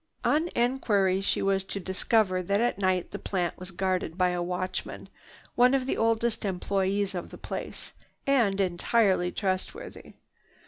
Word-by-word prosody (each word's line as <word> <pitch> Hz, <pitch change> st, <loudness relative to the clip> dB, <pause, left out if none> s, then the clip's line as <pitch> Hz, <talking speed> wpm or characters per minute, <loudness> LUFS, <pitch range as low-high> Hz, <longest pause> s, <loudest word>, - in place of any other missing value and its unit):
On 320 Hz, +3 st, +2 dB
enquiry 210 Hz, -6 st, +2 dB
she 195 Hz, -, 0 dB
was 195 Hz, -1 st, +2 dB
to 200 Hz, -, -3 dB
discover 190 Hz, +1 st, +1 dB
that 200 Hz, +3 st, 0 dB
at 235 Hz, -4 st, +1 dB
night 185 Hz, -2 st, +1 dB
the -, -, -5 dB
plant 180 Hz, -3 st, -2 dB
was 185 Hz, +1 st, -7 dB
guarded 185 Hz, -2 st, -1 dB
by 180 Hz, -1 st, +3 dB
a 180 Hz, 0 st, -1 dB
watchman, 180 Hz, +1 st, -4 dB, 0.4 s
one 250 Hz, +2 st, +5 dB
of 260 Hz, -1 st, 0 dB
the 265 Hz, -, -1 dB
oldest 225 Hz, 0 st, +1 dB
employees 195 Hz, +1 st, 0 dB
of 175 Hz, -2 st, -5 dB
the -, -, -10 dB
place, -, -, -6 dB, 0.3 s
and 235 Hz, -8 st, +3 dB
entirely 185 Hz, 0 st, +2 dB
trustworthy. 195 Hz, -, -4 dB
195 Hz, 150 wpm, -28 LUFS, 185-225 Hz, 0.4 s, one